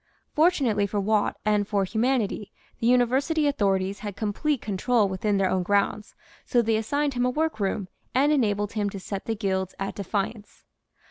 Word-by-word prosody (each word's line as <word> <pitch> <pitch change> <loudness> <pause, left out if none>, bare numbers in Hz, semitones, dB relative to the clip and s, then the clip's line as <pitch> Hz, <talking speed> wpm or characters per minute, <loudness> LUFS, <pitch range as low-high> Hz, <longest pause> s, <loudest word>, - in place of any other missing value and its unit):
Fortunately 275 - +2
for 205 +1 -2
Watt 210 +1 +1
and 210 -1 +2
for 200 -2 +1
humanity 220 -1 -1 0.3
the 230 - 0
University 260 +6 +3
authorities 195 -7 +1
had 205 -1 -6
complete 235 +8 -1
control 215 +2 +1
within 195 +2 0
their 195 -1 +2
own 185 - +1
grounds, 205 +3 0 0.3
so 245 - +1
they 225 0 +1
assigned 285 +6 0
him 245 0 0
a 250 - +2
workroom 220 -10 -1 0.3
and 280 +3 +4
enabled 205 -7 +1
him 210 -2 0
to 195 - -7
set 195 +1 -6
the 225 - -1
guilds 190 -3 -2
at 195 0 -3
defiance. 205 +2 -4
210 Hz, 165 wpm, -26 LUFS, 200-250 Hz, 0.3 s, and